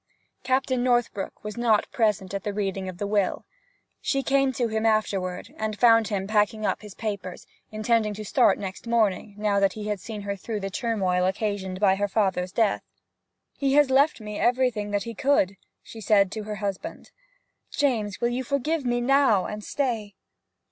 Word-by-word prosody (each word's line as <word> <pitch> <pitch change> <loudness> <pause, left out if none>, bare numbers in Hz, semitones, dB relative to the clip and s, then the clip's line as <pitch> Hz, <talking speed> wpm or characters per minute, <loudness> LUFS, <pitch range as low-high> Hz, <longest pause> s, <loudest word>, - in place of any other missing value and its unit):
Captain 260 -1 0
Northbrook 240 -5 0
was 210 +2 -6
not 230 -3 +2
present 210 -4 0
at 200 0 -3
the 205 -1 -3
reading 195 -2 -2
of 180 - -8
the 205 - -3
will. 200 -2 0 0.6
She 275 -1 0
came 275 0 +2
to 240 -1 0
him 220 0 -2
afterward, 200 -5 0
and 215 -1 -3
found 225 0 +5
him 200 -2 -2
packing 215 +1 +1
up - - -1
his 210 -2 -11
papers, 200 -5 -5 0.3
intending 215 0 +1
to 215 +1 -7
start - - +3
next 190 +3 -7
morning, 215 -3 +1
now 210 -1 +1
that 195 -1 +2
he 210 -1 -5
had 205 -2 -2
seen 215 +1 -7
her 200 0 -3
through 210 +2 -5
the 195 0 -4
turmoil 190 -5 0
occasioned 190 -1 -2
by 195 -2 +4
her 205 +1 0
father's 190 -3 0
death. 210 0 +1 0.8
'He 275 -1 +1
has 290 -2 +5
left 280 +2 +4
me 210 -1 -6
everything 245 -4 +1
that 205 -1 -1
he 230 - -6
could!' 210 -6 +2 0.3
she 225 - -11
said 200 -2 +3
to 215 -1 -5
her 210 0 -4
husband. 205 - -5 0.6
'James, 225 -8 0
will 235 - +1
you 250 +2 -2
forgive 280 +4 -1
me 240 -1 0
now, 260 -7 +3
and 210 0 -6
stay?' 225 -8 -2
215 Hz, 185 wpm, -25 LUFS, 200-240 Hz, 0.8 s, found